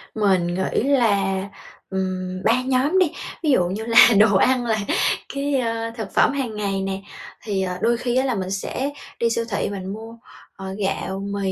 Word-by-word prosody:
Mình 190 -5 +2
nghĩ 185 +4 -1
là, 200 -8 +2 0.5
ừm, 185 -1 -3
3 240 +3 +3
nhóm 270 +8 +2
đi. 350 -5 +3 0.3
Ví 305 - +1
dụ 180 -9 +3
như 210 +5 -4
là 230 0 +8
đồ 210 -2 +5
ăn 250 +4 +3
là 220 -2 +1 0.6
cái, 280 0 -1
ơ, 230 -1 -2
thực 220 -3 -5
phẩm - - +4
hàng 250 -6 -3
ngày 200 -2 -2
nè. 195 0 -3 0.4
Thì, 200 -3 -2
ờ, 180 -1 -3
đôi 235 0 +2
khi 245 0 -2
á, 260 +1 +2
là 250 -4 0
mình 190 -1 -3
sẽ 255 +7 -2 0.3
đi 235 - +2
siêu 230 0 -1
thị 200 - -1
mình 190 0 -5
mua, 225 +2 -9 0.4
ờ, 190 0 -7
gạo, 195 -1 -2
mì, 195 -1 -1
210 Hz, 195 wpm, -22 LUFS, 190-240 Hz, 0.6 s, là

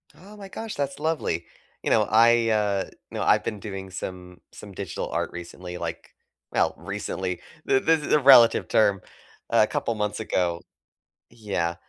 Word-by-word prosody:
Oh, 205 +3 -14
my 200 -1 -9
gosh, 220 +2 -6
that's 140 -1 -3
lovely. 150 - -1 0.4
You - - -1
know, - - +4
I, 115 +2 +5
uh, 105 -3 +1 0.3
know, - - -4
I've - - +3
been 105 - -4
doing 95 -1 -7
some 90 -1 -8
some 105 - -11
digital 95 -3 -5
art - - -2
recently, 90 +1 -8
like 85 -1 -6 0.4
well, - - +2
recently, 90 -2 -4 0.3
th 130 - +3
this 160 -1 +3
is - - 0
a 150 - +6
relative 125 -4 +7
term. 100 -3 +3 0.5
A - - +5
couple 115 - -2
months 105 0 -2
ago 85 -5 -1 0.7
Yeah, 100 -7 -2
105 Hz, 160 wpm, -25 LUFS, 90-120 Hz, 0.7 s, relative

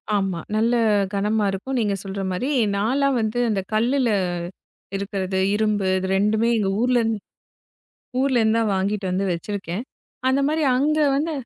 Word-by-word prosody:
ஆமா. 195 -4 -1 0.2
நல்ல 230 +3 +2 0.4
கனமா 210 +2 +1
இருக்கும். 255 +8 -3
நீங்க 205 -3 +1
சொல்ற 195 0 -5
மாரி. 215 +10 -2 0.3
நான் 210 +5 0
எல்லாம் 275 -2 +2
வந்து 220 +2 -1
அந்த 200 -3 0
கல்லுல 245 +3 +2 0.9
இருக்கிறது, 195 -1 -3 0.2
இரும்பு 210 -2 +1
இது 190 0 -3
2மே 215 +3 +2
எங்க 200 -3 0
ஊர்ல 250 +1 +3
இருந்து 225 -2 -1 1.0
ஊர்ல 260 -3 +2
இருந்துதான் 220 -1 +2
வாங்கிட்டு 195 +1 -1
வந்து 185 +2 0
வச்சிருக்கேன். 195 +2 -4 0.5
அந்த 265 +1 +2
மாதிரி 310 +1 0
அங்க 300 +4 +2 0.2
வந்து 315 +3 -1
215 Hz, 145 wpm, -23 LUFS, 195-245 Hz, 1.0 s, ஊர்ல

